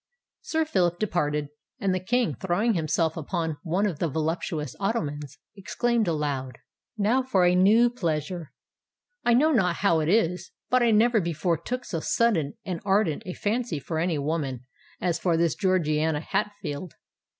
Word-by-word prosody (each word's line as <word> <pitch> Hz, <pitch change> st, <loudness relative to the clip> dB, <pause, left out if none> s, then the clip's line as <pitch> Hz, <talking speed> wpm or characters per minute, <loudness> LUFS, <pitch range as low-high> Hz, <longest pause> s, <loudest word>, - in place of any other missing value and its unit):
Sir 320 Hz, 0 st, 0 dB
Phillip 180 Hz, -, +1 dB
departed; 150 Hz, -7 st, -1 dB, 0.3 s
and 195 Hz, -5 st, +1 dB
the 185 Hz, -, 0 dB
King, 240 Hz, +6 st, 0 dB
throwing 195 Hz, +5 st, 0 dB
himself 160 Hz, -1 st, 0 dB
upon 160 Hz, -1 st, -3 dB
one 185 Hz, +4 st, 0 dB
of 180 Hz, -8 st, -2 dB
the 170 Hz, -, +1 dB
voluptuous 160 Hz, 0 st, -2 dB
ottomans, 150 Hz, -, -2 dB, 0.2 s
exclaimed 230 Hz, +2 st, 0 dB
aloud, 145 Hz, -5 st, -2 dB, 0.4 s
"Now 220 Hz, +6 st, +2 dB
for 200 Hz, -9 st, +2 dB
a 175 Hz, -, +4 dB
new 205 Hz, +6 st, +5 dB
pleasure! 170 Hz, -, -3 dB, 0.7 s
I 240 Hz, -, +4 dB
know 305 Hz, +6 st, +4 dB
not 185 Hz, -, +2 dB
how 170 Hz, -4 st, +2 dB
it 155 Hz, -, -1 dB
was, 180 Hz, -2 st, +1 dB, 0.2 s
but 255 Hz, 0 st, +4 dB
I 240 Hz, -, +4 dB
never 225 Hz, +1 st, +4 dB
before 170 Hz, 0 st, 0 dB
took 250 Hz, 0 st, -4 dB
so 165 Hz, -, -3 dB
sudden 165 Hz, -7 st, +1 dB
and 180 Hz, -4 st, -4 dB
ardent 195 Hz, -5 st, +1 dB
a 180 Hz, -, -3 dB
fancy 220 Hz, -4 st, -1 dB
for 160 Hz, +4 st, -4 dB
any 170 Hz, -1 st, 0 dB
woman, 140 Hz, -4 st, -2 dB, 0.3 s
as 175 Hz, -2 st, 0 dB
for 170 Hz, -3 st, +1 dB
this 165 Hz, -2 st, +2 dB
Georgiana 160 Hz, -5 st, +1 dB
Hatfield. 185 Hz, -4 st, -3 dB
180 Hz, 160 wpm, -26 LUFS, 155-210 Hz, 0.7 s, new